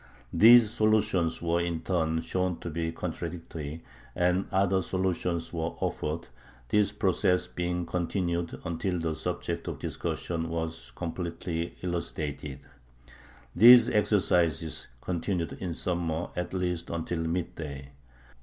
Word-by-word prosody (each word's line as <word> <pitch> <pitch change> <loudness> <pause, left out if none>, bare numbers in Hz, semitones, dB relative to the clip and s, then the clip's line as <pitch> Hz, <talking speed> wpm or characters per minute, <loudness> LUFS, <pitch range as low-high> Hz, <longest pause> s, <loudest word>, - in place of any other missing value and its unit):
These 115 -1 +8
solutions 105 -7 +2
were, 85 0 +2
in 85 -2 -2
turn, 80 -3 0
shown 90 -1 -1
to 85 - -5
be 80 +1 -2
contradictory, 80 -2 -5 0.3
and 90 +2 +2
other 95 -1 +3
solutions 90 -2 -1
were 80 0 -2
offered, 80 +3 -2 0.4
this 105 -1 +3
process 95 -2 +2
being 90 -1 -2
continued 85 -1 -2
until 90 +2 -1
the 80 -1 -1
subject - - -3
of - - -3
discussion 85 -1 -3
was 80 0 -4
completely 85 -1 -4
elucidated. 75 -5 -4 0.9
These 120 +5 +9
exercises 85 -7 +1
continued 90 -1 -2
in 85 -3 -3
summer 85 -2 -2
at 90 +1 -3
least 90 -2 -2
until 85 0 -2
midday. 80 -5 -4
85 Hz, 115 wpm, -29 LUFS, 80-90 Hz, 0.9 s, These